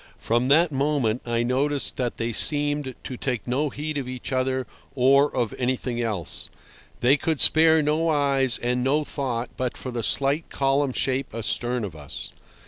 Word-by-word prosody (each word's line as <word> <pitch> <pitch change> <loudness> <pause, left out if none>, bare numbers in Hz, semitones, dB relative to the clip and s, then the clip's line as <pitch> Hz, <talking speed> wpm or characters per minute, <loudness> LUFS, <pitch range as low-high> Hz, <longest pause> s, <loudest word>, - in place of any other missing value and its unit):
From 120 +2 0
that 160 +4 +4
moment 135 -5 0
I 120 0 0
noticed 135 +4 0
that 125 -2 -2
they 115 0 -2
seemed 145 -1 0
to 130 - -6
take 125 -4 -3
no 140 +5 0
heed 150 +2 -4
of 130 - -5
each 130 0 -6
other 130 0 0 0.3
or 140 +3 +4
of 120 -4 -1
anything 125 -1 -1
else. 105 -8 -4 0.5
They 130 +4 +4
could 160 -1 -1
spare 160 0 +6
no 155 +3 +1
eyes 140 -4 +2
and 125 +1 -1
no 145 +4 +2
thought 125 -5 -3
but 130 -1 -3
for 130 - -6
the 120 -1 -3
slight 140 +7 +1
column 135 0 +1
shape 130 -2 -1
astern 120 +1 -1
of 95 -6 -6
us. 75 -2 -6
130 Hz, 170 wpm, -24 LUFS, 120-145 Hz, 0.5 s, spare